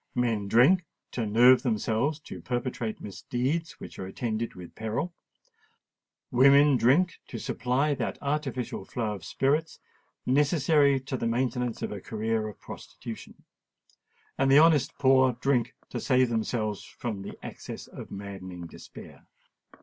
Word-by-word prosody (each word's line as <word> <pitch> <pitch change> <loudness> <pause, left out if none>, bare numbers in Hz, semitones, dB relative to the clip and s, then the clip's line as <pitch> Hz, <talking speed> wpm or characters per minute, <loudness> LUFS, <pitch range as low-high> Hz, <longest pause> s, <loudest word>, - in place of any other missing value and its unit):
Men 115 -5 0
drink 135 - +5 0.3
to 115 -3 -2
nerve 120 +4 +6
themselves 120 +4 0
to - - -9
perpetrate 120 -3 -3
misdeeds 130 - -3
which - - -10
are 95 - -4
attended 115 +3 -3
with 90 -2 -10
peril: 110 +11 -3 1.2
women 140 +3 +6
drink 145 +9 +3
to 120 - -6
supply 130 +6 0
that - - -3
artificial 140 -7 -3
flow 110 +1 -3
of 95 -4 -8
spirits 150 - 0 0.5
necessary 140 0 +3
to 130 0 -4
the 115 - -1
maintenance 125 0 -1
of - - -2
a 100 -2 -6
career 110 -1 -2
of 105 - -9
prostitution;—and 135 0 -8
the 140 - +8
honest 155 -3 +4
poor 130 -2 +4
drink 125 -1 0
to - - -4
save 130 -2 +3
themselves 110 -2 -1
from 110 -5 -6
the 100 - -8
access - - -8
of - - -10
maddening 95 -3 -7
despair. 85 - -13
125 Hz, 135 wpm, -28 LUFS, 110-140 Hz, 1.2 s, the